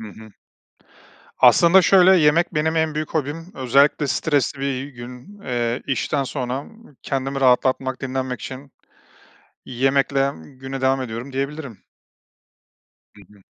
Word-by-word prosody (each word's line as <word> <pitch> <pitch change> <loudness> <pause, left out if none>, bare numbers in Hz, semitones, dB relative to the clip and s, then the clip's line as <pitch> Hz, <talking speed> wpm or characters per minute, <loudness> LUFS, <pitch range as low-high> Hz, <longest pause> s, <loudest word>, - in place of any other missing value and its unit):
Hı 110 - -8
hı. 110 +2 -13 1.1
Aslında 175 +3 +6
şöyle, 185 +1 +6
yemek 165 +2 +2
benim 160 +1 0
en 160 -1 0
büyük 155 0 -3
hobim. 160 +4 -3
Özellikle 140 +3 +2
stresli 140 -1 0
bir, 140 - -2 0.2
eee, 140 - -9
gün, 125 +10 -12
eee, 120 0 -2
işten 135 +1 -1
sonra, 130 -1 -4
ımm, 220 -3 -18
kendimi 135 0 -3
rahatlatmak, 130 0 +1
dinlenmek 130 -1 -4
için 135 +1 -9 0.9
yemekle 135 +2 +1
güne 135 0 -8
devam 130 0 +1
ediyorum 120 +2 -7
diyebilirim. 140 -3 -5 1.3
Hı 105 - -16
hı. 100 -2 -22
135 Hz, 130 wpm, -21 LUFS, 130-150 Hz, 1.3 s, Aslında